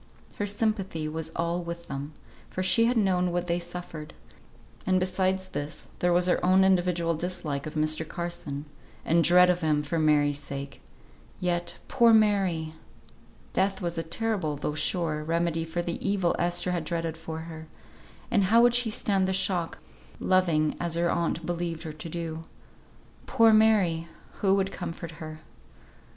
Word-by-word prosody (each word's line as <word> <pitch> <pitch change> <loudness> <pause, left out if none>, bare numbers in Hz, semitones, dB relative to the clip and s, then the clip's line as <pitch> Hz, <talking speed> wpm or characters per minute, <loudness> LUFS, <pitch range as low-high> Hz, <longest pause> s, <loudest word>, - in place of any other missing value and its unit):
Her 205 - -1
sympathy 200 -6 -1
was 160 +1 -4
all 170 +1 -1
with 170 0 -7
them, 140 +2 -5 0.4
for 185 - -3
she 230 +5 +4
had 240 +1 +2
known 180 -4 +2
what 175 0 -1
they 170 0 0
suffered; 170 -3 -8 0.7
and 185 0 +2
besides 185 0 0
this 145 +2 -5
there 175 - +2
was 175 +1 +3
her 180 - +1
own 185 +1 +5
individual 175 -3 +2
dislike 160 -4 -3
of 155 - -7
Mr. 155 +1 +1
Carson, 170 -5 -5 0.4
and 165 +1 +3
dread 180 +2 +6
of 180 0 +1
him 150 -2 +1
for 160 +3 -2
Mary's 145 -2 +3
sake. 140 -1 -7 0.6
Yet, 175 -1 -1
poor 235 -3 +5
Mary! 195 -7 +2 0.8
Death 195 0 +1
was 175 -2 -3
a 165 - -1
terrible, 170 -2 -1
though 145 +1 -3
sure, 155 -1 -1
remedy 165 0 0
for 165 +2 -3
the 170 0 -4
evil 195 -3 +1
Esther 175 +1 +1
had 175 -2 -1
dreaded 165 0 -3
for 160 0 -6
her; 160 -1 -9 0.6
and 205 -4 +3
how 230 +5 +5
would 240 0 +5
she 245 -1 +3
stand 195 -3 +1
the 190 - 0
shock, 185 -3 0 0.4
loving 170 -5 +2
as 170 -1 -2
her 170 0 +1
aunt 170 -1 -1
believed 170 -1 -3
her 155 -2 -6
to 155 +2 -7
do? 165 -1 -5 0.8
Poor 225 -1 +5
Mary! 200 -7 +3 0.3
who 195 -1 +3
would 195 0 0
comfort 170 -3 -6
her? 155 0 -8
170 Hz, 165 wpm, -27 LUFS, 160-185 Hz, 0.8 s, dread